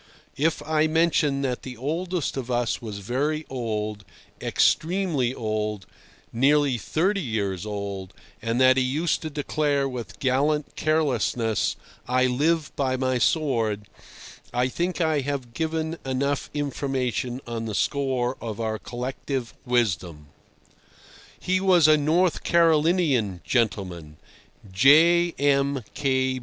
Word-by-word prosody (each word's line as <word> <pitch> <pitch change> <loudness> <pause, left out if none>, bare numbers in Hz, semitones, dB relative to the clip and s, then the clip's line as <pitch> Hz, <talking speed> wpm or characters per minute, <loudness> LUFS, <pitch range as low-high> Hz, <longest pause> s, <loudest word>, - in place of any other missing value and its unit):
If 155 +3 0
I 155 0 +2
mention 155 -3 +2
that 125 -2 -2
the 125 -2 -8
oldest 170 +6 -2
of 130 -2 -5
us 120 -2 0
was 110 -4 -6
very 145 +10 -2
old, 110 -4 -3 0.4
extremely 165 -7 +1
old—nearly 115 +5 -1
thirty 190 - 0
years 105 - -2
old—and 100 +3 -5
that 130 0 +6
he 130 - +3
used 150 +6 0
to 155 - -4
declare 145 -1 0
with 120 -9 -7
gallant 140 +3 0
carelessness, 125 -8 0 0.3
"I 130 +1 +2
live 150 +5 +1
by 130 -2 0
my 130 -1 0
sword," 115 -9 0 0.6
I 125 +1 +1
think 175 +7 -2
I 160 -2 +2
have 135 -3 -4
given 160 +3 -2
enough 135 +1 -1
information 130 -4 -2
on 115 -1 -4
the 110 -2 -4
score 130 +1 0
of 110 -2 -5
our 110 -1 -2
collective 125 0 -4
wisdom. 85 -11 -1 1.1
He 185 +1 0
was 180 -5 +5
a 155 - +7
North 160 +4 +1
Carolinian 160 - +2
gentleman, 90 -10 -1 0.6
J. 165 - +5
M. 140 -2 +1
130 Hz, 115 wpm, -25 LUFS, 115-155 Hz, 1.1 s, a